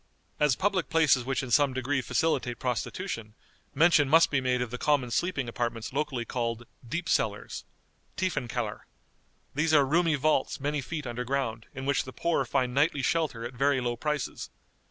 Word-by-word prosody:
As 150 Hz, -4 st, +3 dB
public 190 Hz, -2 st, 0 dB
places 155 Hz, -6 st, +4 dB
which 135 Hz, 0 st, -1 dB
in 125 Hz, -, -6 dB
some 140 Hz, +3 st, +4 dB
degree 130 Hz, +1 st, 0 dB
facilitate 130 Hz, -2 st, 0 dB
prostitution, 120 Hz, -, -3 dB, 0.4 s
mention 150 Hz, -2 st, +5 dB
must 165 Hz, +3 st, +6 dB
be 140 Hz, -2 st, +2 dB
made 125 Hz, -1 st, +1 dB
of 125 Hz, -2 st, -3 dB
the 125 Hz, -, -5 dB
common 140 Hz, -5 st, +1 dB
sleeping 140 Hz, -2 st, 0 dB
apartments 115 Hz, 0 st, -3 dB
locally 135 Hz, -4 st, -1 dB
called 115 Hz, -1 st, -3 dB, 0.2 s
"deep 170 Hz, +6 st, -3 dB
cellars" -, -, -1 dB, 0.5 s
(tiefen 185 Hz, -9 st, -1 dB
kellar). 115 Hz, -3 st, -4 dB, 0.7 s
These 155 Hz, +2 st, +2 dB
are 145 Hz, -2 st, +6 dB
roomy 165 Hz, +3 st, +2 dB
vaults, 145 Hz, -1 st, +1 dB
many 145 Hz, +1 st, -1 dB
feet 150 Hz, +2 st, -5 dB
under 120 Hz, 0 st, -3 dB
ground, 120 Hz, -4 st, -2 dB
in 135 Hz, 0 st, -5 dB
which 140 Hz, 0 st, +1 dB
the 130 Hz, -, -10 dB
poor 170 Hz, -5 st, 0 dB
find 125 Hz, -1 st, 0 dB
nightly 140 Hz, 0 st, +2 dB
shelter 145 Hz, -9 st, 0 dB
at 120 Hz, -, -6 dB
very 135 Hz, +2 st, +2 dB
low 120 Hz, -1 st, -1 dB
prices. 150 Hz, +2 st, -3 dB
135 Hz, 175 wpm, -28 LUFS, 125-150 Hz, 0.7 s, must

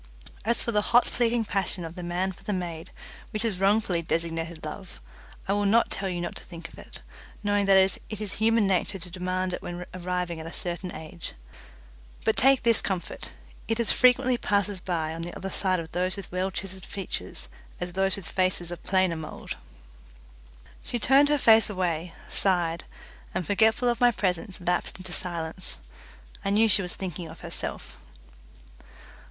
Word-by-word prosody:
As 235 Hz, +1 st, +3 dB
for 235 Hz, -, -1 dB
the 210 Hz, -2 st, +3 dB
hot 240 Hz, +3 st, +4 dB
fleeting 235 Hz, -1 st, +1 dB
passion 195 Hz, -3 st, -1 dB
of 165 Hz, -, -7 dB
the 180 Hz, -, -7 dB
man 175 Hz, +2 st, -1 dB
for 180 Hz, -, -15 dB
the 210 Hz, -, -2 dB
maid, 170 Hz, -3 st, -4 dB, 0.4 s
which 215 Hz, +2 st, -2 dB
is 205 Hz, -5 st, 0 dB
wrongfully 195 Hz, -3 st, +3 dB
designated 165 Hz, 0 st, -2 dB
love, 190 Hz, -3 st, -7 dB, 0.5 s
I 195 Hz, -, +2 dB
will 205 Hz, 0 st, +2 dB
not 230 Hz, +4 st, +4 dB
tell 195 Hz, -1 st, -2 dB
you 175 Hz, -1 st, -2 dB
not 175 Hz, -, -3 dB
to -, -, -8 dB
think 170 Hz, -1 st, -9 dB
of -, -, -14 dB
it, -, -, -12 dB, 0.4 s
knowing 205 Hz, -1 st, +2 dB
that 195 Hz, -1 st, +7 dB
it 190 Hz, 0 st, +4 dB, 0.2 s
is 210 Hz, -3 st, -2 dB
human 225 Hz, 0 st, +3 dB
nature 195 Hz, 0 st, +1 dB
to 180 Hz, -1 st, -7 dB
demand 185 Hz, 0 st, -1 dB
it -, -, -3 dB
when 175 Hz, 0 st, -5 dB
arriving 180 Hz, -2 st, -2 dB
at 160 Hz, -, -6 dB
a -, -, -6 dB
certain 180 Hz, +1 st, -3 dB
age; 160 Hz, +2 st, -8 dB, 0.9 s
but 220 Hz, -, +3 dB
take 270 Hz, +1 st, +5 dB
this 230 Hz, -1 st, +4 dB
comfort: 185 Hz, -3 st, -3 dB, 0.4 s
it 225 Hz, +1 st, 0 dB
as 235 Hz, -, +4 dB
frequently 250 Hz, 0 st, +4 dB
passes 200 Hz, -3 st, +1 dB
by 160 Hz, -4 st, -1 dB
on 165 Hz, -, -5 dB
the 175 Hz, +1 st, -5 dB
other 195 Hz, -, -5 dB
side 185 Hz, -1 st, +1 dB
of 160 Hz, -1 st, -7 dB
those 180 Hz, +2 st, +1 dB
with 195 Hz, -, -7 dB
well 185 Hz, +1 st, 0 dB
chiselled 190 Hz, 0 st, -6 dB
features 195 Hz, -1 st, -4 dB, 0.3 s
as 175 Hz, 0 st, -4 dB
those 195 Hz, +1 st, +2 dB
with 200 Hz, -4 st, -8 dB
faces 185 Hz, -2 st, 0 dB
of 175 Hz, -, -6 dB
plainer 185 Hz, -3 st, +2 dB
mould." 160 Hz, -1 st, -6 dB, 1.3 s
She 240 Hz, -, -3 dB
turned 270 Hz, +5 st, +5 dB
her 295 Hz, -, +4 dB
face 225 Hz, -4 st, +6 dB
away, 175 Hz, -4 st, -2 dB
sighed, 170 Hz, -4 st, +3 dB, 0.5 s
and 185 Hz, -2 st, -1 dB
forgetful 220 Hz, +5 st, +3 dB
of 240 Hz, +1 st, +1 dB
my 245 Hz, -, +7 dB
presence 190 Hz, -3 st, -1 dB
lapsed 180 Hz, +1 st, 0 dB
into 185 Hz, -1 st, -6 dB
silence. 170 Hz, -, -2 dB, 0.7 s
I -, -, 0 dB
knew 215 Hz, +3 st, +5 dB
she 200 Hz, -1 st, +4 dB
was 180 Hz, -2 st, -4 dB
thinking 180 Hz, -3 st, -5 dB
of 160 Hz, +1 st, -11 dB
herself. 170 Hz, -1 st, -6 dB
185 Hz, 180 wpm, -27 LUFS, 175-210 Hz, 1.3 s, that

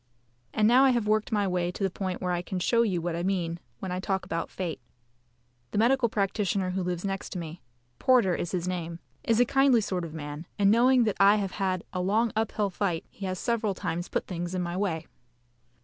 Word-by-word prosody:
And 215 Hz, 0 st, +3 dB
now 250 Hz, +4 st, +6 dB
I 270 Hz, -, +6 dB
have 240 Hz, -4 st, +1 dB
worked 215 Hz, 0 st, +1 dB
my 205 Hz, -2 st, +2 dB
way 180 Hz, -1 st, 0 dB
to 195 Hz, -, -5 dB
the 195 Hz, -, +2 dB
point 185 Hz, -1 st, -4 dB
where 180 Hz, -, 0 dB
I 175 Hz, -1 st, 0 dB
can 185 Hz, +1 st, -5 dB
show 230 Hz, +6 st, +2 dB
you 195 Hz, -7 st, +1 dB
what 175 Hz, -1 st, -1 dB
I 170 Hz, -, -2 dB
mean 175 Hz, -2 st, -1 dB, 0.2 s
when 190 Hz, -, -5 dB
I 180 Hz, -, -2 dB
talk 190 Hz, 0 st, -1 dB
about 165 Hz, 0 st, -3 dB
fate. 175 Hz, -6 st, -4 dB, 0.9 s
The -, -, -4 dB
medical 240 Hz, +2 st, +3 dB
practitioner 200 Hz, -2 st, 0 dB
who 190 Hz, +1 st, -1 dB
lives 180 Hz, 0 st, -2 dB
next 195 Hz, -1 st, -4 dB
me 170 Hz, -1 st, -6 dB, 0.4 s
Porter 250 Hz, -9 st, +4 dB
is 175 Hz, -, -2 dB
his 180 Hz, -1 st, -2 dB
name 170 Hz, -2 st, -3 dB, 0.3 s
is 230 Hz, 0 st, +2 dB
a 245 Hz, -, +6 dB
kindly 270 Hz, -1 st, +4 dB
sort 185 Hz, -4 st, -2 dB
of 165 Hz, -1 st, -7 dB
man, 150 Hz, +2 st, -6 dB
and 200 Hz, -1 st, +4 dB
knowing 250 Hz, +2 st, +5 dB
that 215 Hz, -3 st, 0 dB
I 200 Hz, +1 st, +7 dB
have 200 Hz, -3 st, -1 dB
had 185 Hz, -3 st, -1 dB
a 180 Hz, -, -1 dB
long 215 Hz, +5 st, +2 dB
uphill 215 Hz, -2 st, 0 dB
fight, 180 Hz, -3 st, -1 dB
he 195 Hz, -, -6 dB
has 185 Hz, 0 st, -2 dB
several 220 Hz, -1 st, 0 dB
times 175 Hz, +1 st, -3 dB
put -, -, -1 dB
things 175 Hz, 0 st, -4 dB
in 180 Hz, -, -1 dB
my 175 Hz, 0 st, -3 dB
way. 175 Hz, -5 st, -1 dB
190 Hz, 225 wpm, -28 LUFS, 175-215 Hz, 0.9 s, I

